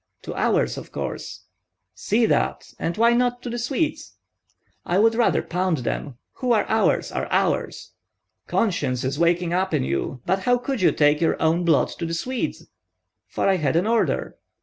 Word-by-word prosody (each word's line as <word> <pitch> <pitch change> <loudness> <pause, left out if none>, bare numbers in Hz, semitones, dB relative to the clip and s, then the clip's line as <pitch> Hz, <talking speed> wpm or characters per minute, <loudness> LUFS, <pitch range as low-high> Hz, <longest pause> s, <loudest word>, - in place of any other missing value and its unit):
"To - - -6
ours, - - +1
of - - -12
course." - - -6 0.5
"See 225 +2 +1
that! - - -1
And 165 - -2
why 235 +1 +4
not 245 0 0
to 245 - -4
the 240 - -3
Swedes?" 300 +5 -2 0.7
"I 175 - 0
would 225 +3 +4
rather 235 0 +2
pound 180 -1 -1
them. 135 0 -3 0.2
Who 250 -2 +1
are 215 - +2
ours, 220 0 +1
are - - -3
ours!" - - -1 0.6
"Conscience 140 - 0
is 135 +3 -2
waking 170 0 +2
up 190 +1 0
in - - +1
you. 70 - -3
But 190 +2 +1
how 245 +6 +2
could 245 -1 -3
you 180 - +5
take 150 +1 +3
your 165 - +1
own 165 +2 +2
blood 160 -4 +3
to 165 - -2
the 165 - -2
Swedes?" 250 +8 -3 0.6
"For - - -1
I 195 -1 +3
had 150 -3 0
an 175 +3 +2
order." 230 +1 0
185 Hz, 180 wpm, -23 LUFS, 165-235 Hz, 0.7 s, you